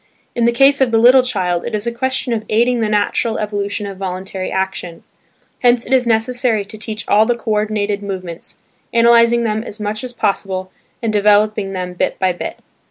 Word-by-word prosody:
In 235 -1 +1
the 235 - +4
case 275 +3 +4
of 265 - +4
the 225 - +3
little 250 +3 +7
child 185 -8 -1
it - - -3
is 210 +1 -4
a 235 - -1
question 260 +1 -2
of 220 -1 -2
aiding 240 +3 +2
the 220 -2 0
natural 210 +2 0
evolution 205 0 -3
of 195 -1 -7
voluntary 185 0 -4
action. 190 -3 -3 0.6
Hence 245 -1 +3
it 265 - -2
is 255 -2 +3
necessary 225 -1 +1
to 205 - -10
teach 215 -1 -5
all 215 +2 +4
the 240 - +2
co 225 -1 -4
ordinated 210 -1 -1
movements, 185 -4 -6 0.3
analysing 235 0 +4
them 215 -1 -1
as 215 -2 -8
much 210 +2 -3
as 250 - -5
possible 195 -4 -2 0.3
and 225 -2 0
developing 210 -1 +2
them 180 -1 -4
bit 180 - -1
by 185 -1 +1
bit. 175 - -6
215 Hz, 195 wpm, -17 LUFS, 200-235 Hz, 0.6 s, little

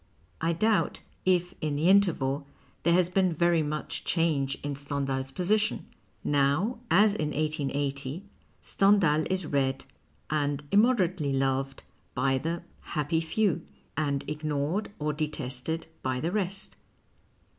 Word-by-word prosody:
I 165 +1 +2
doubt 215 +5 +1 0.2
if 180 -1 +2
in 150 -2 -1
the 155 +4 +1
interval 150 -8 +3 0.3
there 170 +1 +3
has 180 -1 +4
been 185 -1 +2
very 170 0 +3
much 150 0 -3
change 150 -5 +1
in 145 0 -2
Stendhal's 135 -1 -2
position. 205 +9 0 0.4
Now, 145 - +1
as 205 +4 +5
in 155 -7 -1
1880, 145 0 -2 0.4
Stendhal 180 -7 +3
is 190 -2 0
read, 135 -3 0 0.5
and 145 -1 0
immoderately 190 - +3
loved, 135 0 0 0.3
by 135 -1 +2
the 165 +4 -3
" - - -34 0.2
happy 150 +2 +1
few," 195 +3 +1 0.3
and 140 -3 -1
ignored 150 +5 -1
or 150 0 -1
detested 150 0 -3 0.2
by 130 -1 -1
the 165 +6 -1
rest. 195 -1 -3
155 Hz, 125 wpm, -28 LUFS, 140-180 Hz, 0.5 s, as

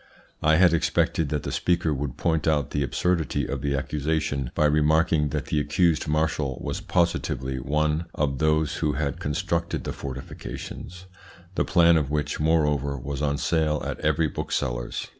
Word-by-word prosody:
I 80 0 +4
had 85 0 +5
expected 80 -2 +1
that 75 -2 -2
the - - -3
speaker 85 -3 +1
would 70 -2 -4
point 80 -1 0
out 75 -4 +1
the 70 - -1
absurdity 80 +3 0
of 70 -1 -3
the 70 -1 0
accusation 75 -1 -1
by 75 - +3
remarking 75 +1 +3
that - - -3
the 75 - 0
accused 80 +3 +1
Marshal 75 -4 0
was - - -4
positively 65 -7 0
one 75 +4 0
of 70 -3 -1
those 75 -1 +1
who 75 -1 0
had 70 -1 -2
constructed 85 +3 -2
the - - -4
fortifications, 70 +6 -7 0.5
the - - 0
plan 85 -2 +5
of 75 -3 0
which, 75 0 -1
moreover, 75 -3 +1
was 70 +2 -5
on 70 -1 +1
sale 80 -1 0
at - - -4
every 80 +1 +2
booksellers. - - -3
75 Hz, 160 wpm, -25 LUFS, 70-80 Hz, 0.5 s, had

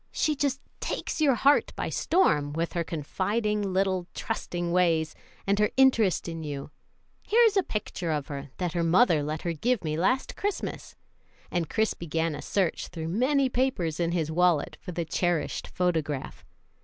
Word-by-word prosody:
She 305 - +1
just 275 -1 -1 0.2
takes - - -3
your 280 -4 +4
heart 280 +4 +3
by - - -3
storm, 150 - +2
with 165 +2 -2
her 170 - 0
confiding, 205 +7 -1
little 190 -2 0
trusting 175 -1 -3
ways 165 -3 +2 0.3
and 200 +1 +1
her 210 - +3
interest 230 -10 +4
in 165 -1 -5
you. 145 -1 -6 0.5
Here's 450 -1 +4
a 390 - +5
picture 200 - -4
of 150 -3 -1
her, 140 0 -6
that 180 -3 -2
her 170 -1 0
mother 165 -1 +4
let 150 +2 -3
her 170 - -1
give 235 +8 0
me 155 -1 -1
last 250 +11 0
Christmas," 410 0 -4 0.6
and 170 -3 -1
Chris 220 -1 +1
began 165 -1 -2
a 145 - -6
search 190 -5 -1
through 160 -1 -5
many 260 - +2
papers 240 - -1
in 170 -1 +1
his 160 -3 -1
wallet 175 -2 +2
for 180 - -7
the 170 -1 -3
cherished 175 -1 -1
photograph. 160 -6 -2
175 Hz, 170 wpm, -27 LUFS, 160-225 Hz, 0.6 s, a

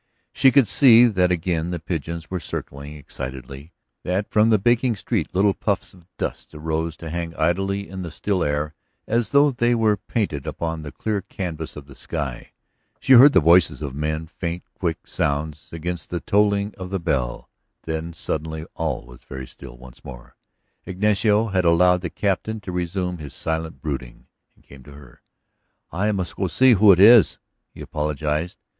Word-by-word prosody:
She 135 - +5
could 135 -4 +5
see 120 +1 +7
that 90 -6 +2
again 85 -1 -1
the 90 - -3
pigeons 80 0 -5
were 90 - -2
circling 70 -2 -7
excitedly; 65 +1 -8 0.3
that 95 +3 -2
from 110 +1 +4
the 110 - +5
baking 120 +3 +2
street 100 -3 -2
little 100 +2 +2
puffs - - -2
of 90 -3 -20
dust - - -5
arose 80 +1 -3
to 80 -2 -8
hang 85 -1 -4
idly 95 +5 0
in 95 -1 -7
the 85 - -5
still 90 +3 -1
air 75 +1 -1 0.3
as 115 0 0
though 145 +1 +4
they 120 -1 +1
were 110 -2 +2
painted 95 - -3
upon 80 -1 -4
the 75 -1 -8
clear 105 +7 -2
canvas 85 -4 -6
of 75 - -9
the 70 - -14
sky. - - -5 0.5
She 130 - +4
heard 135 +4 +9
the - - +6
voices 80 -2 +4
of 70 -3 -5
men, 75 +2 -3
faint, 85 +1 -5
quick 85 -3 -3
sounds 75 +1 -3
against 85 0 -5
the 90 - -3
tolling 105 -1 +1
of 95 -1 -6
the 95 0 -2
bell. 70 -8 -2 0.3
Then 80 +1 -4
suddenly 80 -1 -4
all - - -3
was 60 0 -15
very 65 0 -8
still 65 0 -13
once 65 0 -15
more; - - -11 0.5
Ignacio 105 +3 +1
had 95 -2 +1
allowed 90 +1 +4
the 90 - -4
Captain 105 +4 -2
to 95 - -7
resume 90 0 -3
his 75 -3 -9
silent 80 0 -4
brooding, 65 -5 -5 0.3
and - - -28
came 70 -1 -15
to 70 +2 -14
her. 70 -4 -16 0.7
"I 100 +5 0
must 95 -5 -4
go 95 - 0
to - - -5
see 130 +6 +5
who 105 -1 +6
it 90 - +4
is," 110 +3 +7 0.3
he - - -13
apologized. 75 +2 -3
85 Hz, 180 wpm, -22 LUFS, 75-100 Hz, 0.7 s, heard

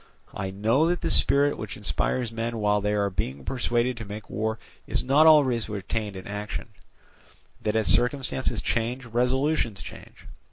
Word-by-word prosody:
I 95 - -4
know 110 +11 +2
that 175 0 0
the - - -1
spirit 145 +1 +4
which 110 -1 -6
inspires 105 +6 -1
men 115 +1 -3
while 105 -1 +1
they 105 +1 0
are 100 -1 0
being 70 -6 -4
persuaded 120 -1 0
to 115 - -5
make 105 +1 -8
war 110 +1 -2 0.3
is - - -1
not 145 +5 +5
always 130 -8 +5
retained 105 0 -4
in 95 - -8
action; 105 +3 -5 0.9
that 105 0 -1
as 110 -1 +2
circumstances 130 +1 +1
change, 120 +3 -1
resolutions 125 -1 0
change. - - -12
115 Hz, 160 wpm, -26 LUFS, 105-125 Hz, 0.9 s, not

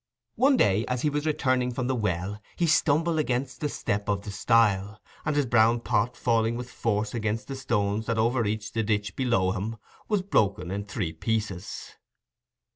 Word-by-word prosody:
One 265 +3 +4
day 100 - +3
as 125 -1 -2
he 150 - +2
was 150 +1 -1
returning 130 -4 +1
from 125 +1 -3
the 130 - 0
well, 105 -2 -2
he 175 - +1
stumbled 160 +1 +2
against 130 -2 -2
the 150 - 0
step 100 -6 -2
of 100 -1 0
the 105 - -6
stile, 105 -1 +2 0.3
and 155 -1 0
his 145 -1 +2
brown 115 -1 +4
pot, 120 +2 0
falling 115 -1 +1
with 125 +1 -6
force 105 -3 -1
against 110 -1 -2
the 135 - -5
stones 110 -4 -1
that 115 -1 0
overarched 110 -2 0
the 115 - +1
ditch 105 -2 -1
below 115 -8 +1
him, 105 +4 -3 0.3
was 205 -4 +1
broken 100 - +1
in 100 +1 -3
three 95 -5 -3
pieces. 100 +1 -3
115 Hz, 180 wpm, -27 LUFS, 105-130 Hz, 0.3 s, One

